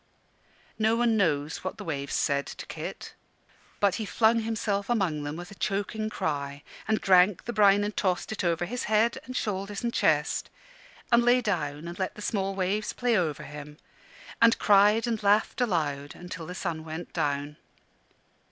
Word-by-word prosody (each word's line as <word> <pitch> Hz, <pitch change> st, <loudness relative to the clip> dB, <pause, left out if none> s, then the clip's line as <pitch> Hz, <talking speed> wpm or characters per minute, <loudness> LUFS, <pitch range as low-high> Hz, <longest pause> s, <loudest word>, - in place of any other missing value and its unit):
No 220 Hz, +1 st, +3 dB
one 235 Hz, -1 st, +2 dB
knows 155 Hz, -7 st, 0 dB
what -, -, -4 dB
the -, -, -7 dB
waves 140 Hz, -4 st, -3 dB
said 140 Hz, -1 st, +1 dB
to -, -, -8 dB
Kit. -, -, -7 dB, 0.7 s
But 200 Hz, -2 st, +3 dB
he -, -, -2 dB
flung 225 Hz, +2 st, +3 dB
himself 215 Hz, -2 st, -2 dB
among 190 Hz, -10 st, +1 dB
them 145 Hz, +1 st, -4 dB
with 175 Hz, +2 st, -8 dB
a -, -, -8 dB
choking 210 Hz, +2 st, -2 dB
cry, 140 Hz, -6 st, -3 dB, 0.2 s
and 220 Hz, -1 st, +2 dB
drank 185 Hz, 0 st, +4 dB
the 240 Hz, -, -3 dB
brine 205 Hz, -1 st, +5 dB
and 210 Hz, +1 st, -3 dB
tossed 185 Hz, 0 st, 0 dB
it 220 Hz, -, -3 dB
over 170 Hz, 0 st, +1 dB
his 245 Hz, +7 st, -4 dB
head, 220 Hz, +4 st, +2 dB
and 255 Hz, 0 st, -5 dB
shoulders 200 Hz, +1 st, -3 dB
and 235 Hz, 0 st, -1 dB
chest, 150 Hz, -1 st, +1 dB, 0.6 s
and 235 Hz, 0 st, +6 dB
lay 245 Hz, +1 st, +5 dB
down 165 Hz, -9 st, -2 dB
and 175 Hz, +2 st, -8 dB
let 185 Hz, -, -2 dB
the 210 Hz, -, -9 dB
small 195 Hz, -2 st, -1 dB
waves 195 Hz, +3 st, -1 dB
play 245 Hz, -1 st, +1 dB
over 160 Hz, -7 st, 0 dB
him, 150 Hz, 0 st, -9 dB, 0.6 s
and 230 Hz, 0 st, +6 dB
cried 210 Hz, +3 st, +5 dB
and 230 Hz, -2 st, -2 dB
laughed 205 Hz, +4 st, +2 dB
aloud 145 Hz, -, -1 dB, 0.2 s
till 165 Hz, -1 st, -6 dB
the 180 Hz, -, -6 dB
sun 165 Hz, -4 st, -3 dB
went 160 Hz, +2 st, -7 dB
down. 145 Hz, +1 st, -2 dB
195 Hz, 175 wpm, -27 LUFS, 155-220 Hz, 0.7 s, and